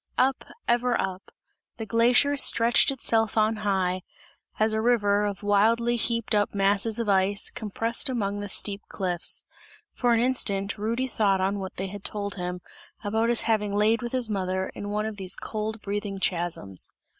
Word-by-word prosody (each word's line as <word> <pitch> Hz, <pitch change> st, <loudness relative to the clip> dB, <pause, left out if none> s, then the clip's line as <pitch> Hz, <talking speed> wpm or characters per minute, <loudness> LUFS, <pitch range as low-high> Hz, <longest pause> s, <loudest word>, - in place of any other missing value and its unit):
Up, 265 Hz, +1 st, +2 dB, 0.2 s
ever 240 Hz, 0 st, +2 dB
up; 190 Hz, 0 st, -4 dB, 0.5 s
the 225 Hz, -, -5 dB
glacier 245 Hz, +6 st, +3 dB
stretched 235 Hz, -3 st, +4 dB
itself 225 Hz, -5 st, +1 dB
on 215 Hz, 0 st, +2 dB
high 190 Hz, -3 st, 0 dB, 0.6 s
as 215 Hz, 0 st, +2 dB
a 220 Hz, -, 0 dB
river, 210 Hz, -3 st, +2 dB
of 200 Hz, 0 st, -5 dB
wildly 225 Hz, +4 st, +3 dB
heaped 230 Hz, -1 st, -1 dB
up 205 Hz, -1 st, +1 dB
masses 200 Hz, +3 st, +2 dB
of 230 Hz, -, -2 dB
ice, 200 Hz, 0 st, +2 dB
compressed 225 Hz, +4 st, -1 dB
among 205 Hz, -5 st, -2 dB
the 205 Hz, 0 st, -5 dB
steep 200 Hz, +1 st, 0 dB
cliffs. 180 Hz, -3 st, 0 dB, 0.5 s
For 245 Hz, -2 st, +2 dB
an -, -, +2 dB
instant 205 Hz, -5 st, 0 dB
Rudy 230 Hz, +5 st, -1 dB
thought 205 Hz, -5 st, +1 dB
on 195 Hz, +2 st, 0 dB
what 190 Hz, -1 st, -6 dB
they 190 Hz, -, -3 dB
had 200 Hz, +1 st, -8 dB
told 200 Hz, -1 st, -3 dB
him, 180 Hz, -1 st, -5 dB, 0.4 s
about 220 Hz, +3 st, 0 dB
his 235 Hz, -, +5 dB
having 210 Hz, -3 st, 0 dB
laid 215 Hz, +3 st, +3 dB
with 240 Hz, 0 st, -5 dB
his 255 Hz, -3 st, 0 dB
mother, 190 Hz, -2 st, -2 dB
in 205 Hz, -, -6 dB
one 210 Hz, +1 st, -1 dB
of 220 Hz, -1 st, -5 dB
these 190 Hz, -1 st, -3 dB
cold 220 Hz, 0 st, -4 dB
breathing 200 Hz, 0 st, -3 dB
chasms. 170 Hz, -, -2 dB
210 Hz, 170 wpm, -26 LUFS, 195-230 Hz, 0.6 s, his